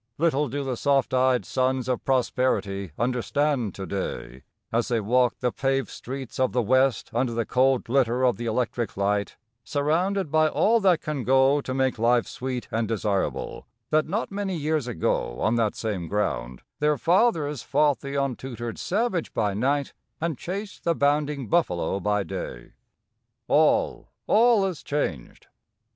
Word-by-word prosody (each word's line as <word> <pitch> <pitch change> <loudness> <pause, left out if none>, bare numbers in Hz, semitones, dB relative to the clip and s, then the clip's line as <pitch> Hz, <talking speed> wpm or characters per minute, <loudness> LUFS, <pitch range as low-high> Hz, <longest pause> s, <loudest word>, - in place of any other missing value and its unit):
Little 150 -3 +1
do 140 +3 -3
the 130 -3 -3
soft 140 -1 +1
eyed 130 -1 +3
sons 130 -1 0
of 125 -1 -1
prosperity 120 - 0
understand 125 -1 0
to 95 - -5
day, 85 -9 -5 0.3
as 115 +1 +1
they 120 -3 +1
walk 120 +3 +2
the 125 -1 +1
paved 135 +2 -1
streets 130 -1 -7
of 130 - +1
the 125 - +2
west 130 +3 +2
under 120 0 0
the 115 -1 0
cold 130 +2 +2
glitter 125 0 +2
of 125 - +2
the 120 0 -4
electric 120 -1 -2
light, 100 0 0 0.3
surrounded 160 - 0
by 155 0 +4
all 225 +8 +3
that 185 -5 +3
can 150 -4 -3
go 135 +3 +4
to 130 - -4
make 130 -3 0
life 120 +1 +3
sweet 130 -1 -5
and 115 0 0
desirable, 105 -3 -2 0.2
that 155 0 +3
not 205 +7 -2
many 195 -2 -2
years 155 -3 -1
ago 80 - -1
on 110 - +1
that 110 -3 +1
same 100 -7 -3
ground 65 -11 -2 0.2
their 150 0 +2
fathers 165 - +2
fought 145 +1 +2
the 140 0 -6
untutored 125 -4 -3
savage 200 -3 -1
by 105 -2 +1
night 135 +6 0 0.3
and 165 -1 -1
chased 200 +8 -6
the 170 -1 +1
bounding 145 -2 +1
buffalo 100 - +1
by 105 +1 0
day. - - -7 0.8
All, - - +2 0.2
all 225 -2 +4
is 185 -5 -3
changed. 85 - -3
130 Hz, 155 wpm, -25 LUFS, 115-150 Hz, 0.8 s, by